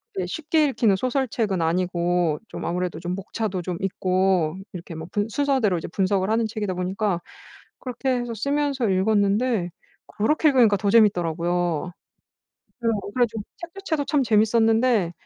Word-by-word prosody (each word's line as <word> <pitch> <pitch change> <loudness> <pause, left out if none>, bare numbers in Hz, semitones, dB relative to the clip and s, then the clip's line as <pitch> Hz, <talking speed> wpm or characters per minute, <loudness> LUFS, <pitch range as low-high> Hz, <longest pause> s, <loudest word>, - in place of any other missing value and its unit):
이게 185 - -1
쉽게 310 - +1
읽히는 235 -7 +2
소설책은 235 -6 -1
아니고 175 -1 0
좀 - - -6
아무래도 180 0 -2
좀 175 +1 -3
목차도 195 -1 -3
좀 175 0 -4
있고 185 -3 +1 0.2
이렇게 175 -1 -8
뭐 160 0 -7
분 205 +1 -1
순서대로 260 -7 +1
이제 165 - -5
분석을 190 +1 0
하는 225 +1 +2
책이다 210 -3 -3
보니까 185 0 -1 0.6
그렇게 255 +1 -4
해서 240 -1 -4
쓰면서 280 0 0
읽었는데 205 +1 +1 0.4
그렇게 300 +9 +2
읽으니까 240 -7 +4
더 200 +1 -1
재밌더라고요. 175 -5 +2 0.9
그래요. 230 -3 0
그래 200 - -8
가지고 220 -2 -5 0.2
책 345 -3 -8
자체도 330 -7 -2
참 295 -3 +2
재밌었는데 225 -2 +3
205 Hz, 360 characters per minute, -24 LUFS, 180-235 Hz, 0.9 s, 읽으니까